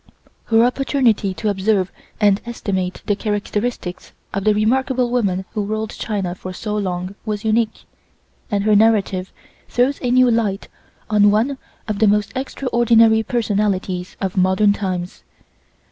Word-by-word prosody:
Her 225 Hz, 0 st, +4 dB
opportunity 250 Hz, -6 st, +1 dB
to 215 Hz, -, -1 dB
observe 195 Hz, -1 st, +1 dB, 0.3 s
and 205 Hz, -2 st, +3 dB
estimate 190 Hz, -6 st, -3 dB
the 205 Hz, -, +1 dB
characteristics 205 Hz, -2 st, -3 dB, 0.2 s
of 195 Hz, +1 st, -2 dB
the 215 Hz, -, +5 dB
remarkable 250 Hz, +3 st, +1 dB
woman 195 Hz, -6 st, 0 dB
who 210 Hz, -, -1 dB
ruled 215 Hz, +2 st, -3 dB
China 195 Hz, -5 st, -3 dB
for 185 Hz, 0 st, -8 dB
so 210 Hz, +3 st, -4 dB
long 185 Hz, -2 st, -3 dB
was 210 Hz, -1 st, -4 dB
unique, 220 Hz, 0 st, 0 dB, 0.7 s
and 205 Hz, -3 st, 0 dB
her 215 Hz, 0 st, +4 dB
narrative 200 Hz, -4 st, +2 dB, 0.4 s
throws 255 Hz, +3 st, +1 dB
a 250 Hz, -, -1 dB
new 250 Hz, 0 st, +5 dB
light 215 Hz, -4 st, -1 dB, 0.4 s
on 205 Hz, -1 st, +5 dB
one 240 Hz, +7 st, +1 dB, 0.3 s
of 210 Hz, -2 st, -2 dB
the 220 Hz, -, +4 dB
most 205 Hz, 0 st, +2 dB
extraordinary 235 Hz, -4 st, +3 dB
personalities 205 Hz, -5 st, -1 dB
of 195 Hz, -1 st, -3 dB
modern 190 Hz, +3 st, +3 dB
times. 185 Hz, -3 st, -4 dB
210 Hz, 140 wpm, -20 LUFS, 195-230 Hz, 0.7 s, the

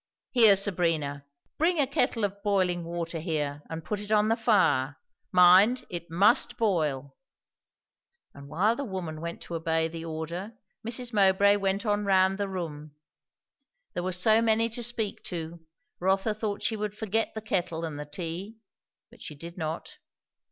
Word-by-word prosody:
Here, 225 Hz, -5 st, +7 dB
Sabrina, 165 Hz, -8 st, -1 dB, 0.3 s
bring 340 Hz, +3 st, +2 dB
a 285 Hz, -, +4 dB
kettle 250 Hz, -4 st, 0 dB
of 200 Hz, 0 st, -2 dB
boiling 185 Hz, -4 st, +1 dB
water 170 Hz, -1 st, -4 dB
here 150 Hz, -3 st, -2 dB
and 160 Hz, -1 st, -6 dB
put 210 Hz, -, -3 dB
it 205 Hz, +1 st, -7 dB
on 215 Hz, 0 st, +3 dB
the 225 Hz, -, +3 dB
fire; 145 Hz, -, +2 dB, 0.3 s
mind, 185 Hz, +7 st, +6 dB
it 170 Hz, -1 st, -6 dB
must 200 Hz, +7 st, +3 dB
boil." 150 Hz, -, -1 dB, 1.2 s
And 140 Hz, 0 st, -12 dB
while 205 Hz, +10 st, +2 dB
the 280 Hz, -, -4 dB
woman 180 Hz, -, -5 dB
went 170 Hz, 0 st, -6 dB
to -, -, -9 dB
obey 160 Hz, 0 st, 0 dB
the 165 Hz, 0 st, -7 dB
order, 165 Hz, +6 st, -5 dB, 0.3 s
Mrs. 240 Hz, +1 st, -4 dB
Mowbray 200 Hz, 0 st, +4 dB
went 195 Hz, +2 st, -1 dB
on 205 Hz, -1 st, +1 dB
round 190 Hz, 0 st, +3 dB
the 200 Hz, -1 st, -1 dB
room. 155 Hz, -5 st, -6 dB, 1.0 s
There -, -, -2 dB
were 185 Hz, +1 st, -2 dB
so 215 Hz, +5 st, +3 dB
many 225 Hz, 0 st, +2 dB
to 235 Hz, +2 st, -5 dB
speak 225 Hz, -3 st, -2 dB
to, 170 Hz, -1 st, -6 dB, 0.4 s
Rotha 195 Hz, +4 st, +1 dB
thought 210 Hz, -1 st, -4 dB
she 225 Hz, -, +1 dB
would 210 Hz, 0 st, -4 dB
forget 220 Hz, +1 st, -1 dB
the -, -, -2 dB
kettle 170 Hz, -5 st, -2 dB
and 150 Hz, -3 st, -6 dB
the 150 Hz, -, -5 dB
tea; 175 Hz, +7 st, -6 dB, 0.5 s
but -, -, -18 dB
she 150 Hz, -, -7 dB
did 170 Hz, +4 st, -10 dB
not. 160 Hz, -2 st, -5 dB
185 Hz, 165 wpm, -28 LUFS, 165-215 Hz, 1.2 s, Here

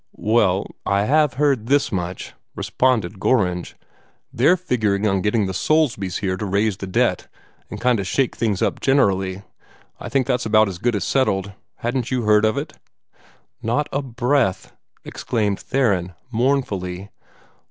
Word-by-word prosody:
"Well, 105 Hz, -4 st, +2 dB, 0.2 s
I 100 Hz, 0 st, +1 dB
HAVE 150 Hz, +3 st, +3 dB
heard 135 Hz, -5 st, +1 dB
this 140 Hz, 0 st, +2 dB
much," 90 Hz, -2 st, -4 dB, 0.2 s
responded 110 Hz, -7 st, 0 dB
Gorringe. 90 Hz, -7 st, 0 dB, 0.6 s
"They're 180 Hz, -, +4 dB
figuring 110 Hz, -, 0 dB
on 95 Hz, -2 st, +1 dB
getting 105 Hz, +1 st, +1 dB
the 95 Hz, -, -3 dB
Soulsbys 115 Hz, -, 0 dB
here 95 Hz, -2 st, -1 dB
to 105 Hz, -, -4 dB
raise 100 Hz, +1 st, 0 dB
the 95 Hz, -, -6 dB
debt 95 Hz, -, 0 dB, 0.4 s
and -, -, -7 dB
kind 125 Hz, -2 st, +2 dB
o' -, -, -1 dB
shake 130 Hz, +7 st, 0 dB
things 105 Hz, -5 st, 0 dB
up -, -, -1 dB
generally. 100 Hz, -8 st, +1 dB, 0.6 s
I -, -, -7 dB
guess 135 Hz, -2 st, +1 dB
that's 125 Hz, 0 st, -1 dB
about 110 Hz, -1 st, +4 dB
as 90 Hz, -2 st, -7 dB
good 120 Hz, +1 st, 0 dB
as 100 Hz, -, -1 dB
settled. 100 Hz, -7 st, 0 dB, 0.2 s
Hadn't 120 Hz, 0 st, -2 dB
you 125 Hz, -2 st, -1 dB
heard 105 Hz, 0 st, +4 dB
of 110 Hz, +5 st, +1 dB
it?" 150 Hz, +2 st, -4 dB, 0.9 s
"Not 130 Hz, +7 st, 0 dB
a 140 Hz, -, -1 dB
breath!" 120 Hz, -5 st, -1 dB, 0.3 s
exclaimed 105 Hz, -4 st, -2 dB
Theron, 100 Hz, -10 st, 0 dB, 0.2 s
mournfully. 105 Hz, -7 st, -1 dB
110 Hz, 150 wpm, -21 LUFS, 95-130 Hz, 0.9 s, They're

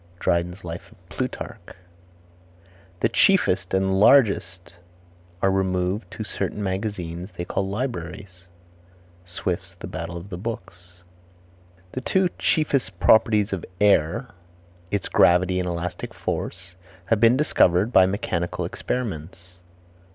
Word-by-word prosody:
Dryden's 90 Hz, +2 st, 0 dB
Life 85 Hz, 0 st, -7 dB
of 90 Hz, -1 st, -23 dB
Plutarch. 120 Hz, -5 st, -6 dB, 1.3 s
"The 115 Hz, -, +3 dB
chiefest 100 Hz, -, +3 dB
and 95 Hz, 0 st, +1 dB
largest 100 Hz, -8 st, +3 dB, 0.7 s
are 95 Hz, -, +4 dB
removed 95 Hz, +2 st, 0 dB
to 110 Hz, -, -6 dB
certain 105 Hz, 0 st, -3 dB
magazines 95 Hz, -2 st, -4 dB
they 85 Hz, -, -3 dB
call 95 Hz, +2 st, -2 dB
libraries." 95 Hz, -5 st, -5 dB, 0.8 s
Swift's 85 Hz, -, -4 dB
Battle 85 Hz, +1 st, -6 dB
of 85 Hz, +4 st, -9 dB
the 90 Hz, -, -5 dB
Books. 90 Hz, -5 st, -8 dB, 0.9 s
The 130 Hz, -, -4 dB
two 185 Hz, +5 st, +2 dB
chiefest 135 Hz, -, 0 dB
properties 105 Hz, +2 st, +4 dB
of 95 Hz, -, -3 dB, 0.2 s
air, 105 Hz, -, +3 dB, 0.6 s
its 100 Hz, -1 st, -2 dB
gravity 90 Hz, +2 st, +4 dB
and 90 Hz, -1 st, -1 dB
elastic 90 Hz, +1 st, -4 dB
force, 85 Hz, -, -4 dB, 0.3 s
have 110 Hz, +2 st, +2 dB
been 115 Hz, +3 st, +5 dB
discovered 105 Hz, -, +3 dB
by 95 Hz, -1 st, +7 dB
mechanical 95 Hz, -3 st, -2 dB
experiments. 90 Hz, -6 st, -5 dB
95 Hz, 115 wpm, -24 LUFS, 90-110 Hz, 1.3 s, by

